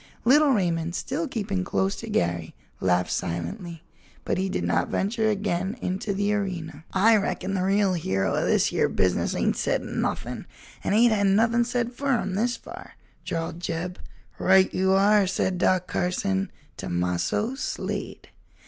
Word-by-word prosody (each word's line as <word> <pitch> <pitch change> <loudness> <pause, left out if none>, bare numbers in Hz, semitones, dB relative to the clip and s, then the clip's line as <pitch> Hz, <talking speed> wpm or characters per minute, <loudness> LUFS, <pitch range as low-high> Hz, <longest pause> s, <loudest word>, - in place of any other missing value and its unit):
Little 290 +4 +6
Raymond, 170 -7 0
still 300 - -2
keeping 205 -7 -2
close 190 +2 0
to 230 - -7
Garry, 85 - -1 0.2
laughed 90 -1 +1
silently, 90 - -4 0.4
but - - 0
he 190 +1 0
did 90 - -2
not 85 +1 +1
venture 220 +2 0
again 200 0 -1
into 190 0 -2
the 205 +1 0
arena. 170 -6 -4
"I 220 +4 +5
reckon 195 -1 -2
the 190 - 0
real 195 0 +2
hero 95 - 0
o' - - +1
this - - +3
here - - +1
business 95 -1 +1
ain't - - +1
said - - 0
nuthin'? - - -3 0.4
and 200 - +1
ain't 230 +1 +5
hed 200 -2 +2
nuthin' 230 +4 +3
said 240 0 -1
fur 275 0 +1
him, 195 -3 -3
this 235 +5 0
far," - - -11 0.3
drawled 165 0 -3
Jeb. 175 +1 -4 0.4
"Right 190 0 +4
you 190 +1 +2
are!" 200 +1 +4
said 185 0 -1
Doc 185 0 +2
Carson. 190 +2 -1 0.3
"Tomasso 90 - -1
Slade." 270 - -5
190 Hz, 155 wpm, -25 LUFS, 170-215 Hz, 0.4 s, Little